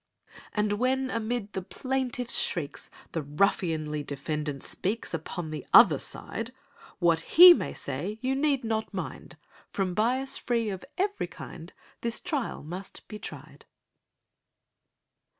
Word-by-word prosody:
And 210 -1 +1
when 260 +1 +1
amid 230 -2 -2
the 190 - -2
plaintiff's 255 +3 0
shrieks, 150 -4 -2 0.2
The 165 - -2
ruffianly 155 -1 0
defendant 145 0 -4
speaks— 210 +2 -3
Upon 165 0 -4
the 155 - -5
other - - +8
side; - - -6 0.4
What 170 -2 +3 0.2
he 355 +1 +13
may - - -3
say 210 +1 -4
you 260 +3 0
need 275 -2 +1
not 220 -1 -2
mind— - - -6 0.3
From 190 -2 -1
bias 250 +7 +1
free 230 -3 0
of 190 -2 -6
every 405 +2 0
kind, - - -10 0.3
This 235 0 0
trial 280 - -3
must 180 +5 -8
be 210 - -8
tried! - - -9
210 Hz, 130 wpm, -28 LUFS, 165-255 Hz, 0.4 s, he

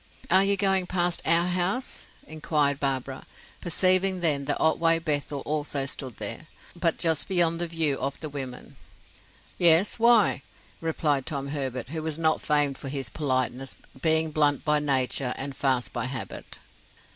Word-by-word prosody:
"Are 190 +2 +6
you 200 0 +2
going 190 -2 +1
past 175 -1 0
our 170 +1 +4
house?" 185 +8 -2 0.2
inquired 150 -2 -1
Barbara, 135 -1 -3 0.3
perceiving 185 +1 +2
then 145 -5 +1
that 145 - -1
Otway 165 +1 +3
Bethel 145 -3 -2
also 145 -2 -2
stood 130 -3 -6
there, 115 +8 -5 0.3
but 170 -2 0
just 160 -2 0
beyond 170 -3 +2
the 175 - -1
view 160 -4 -1
of 135 +1 -3
the 155 - -5
women. 135 -4 -7 0.8
"Yes. 175 +5 +6
Why?" 230 - +4 0.4
replied 150 -4 -1
Tom 140 -2 -3
Herbert, 130 -4 -4
who 160 +2 -4
was 155 -1 -3
not 160 -1 +1
famed 145 -2 0
for 135 - -6
his 135 -5 -4
politeness, 130 -2 -2 0.3
being 160 0 +2
blunt 145 -2 +1
by 150 -1 +3
nature 135 -2 0
and 135 0 -3
"fast" 130 -3 0
by 120 -2 -2
habit. 130 -2 -6
150 Hz, 155 wpm, -26 LUFS, 135-170 Hz, 0.8 s, Are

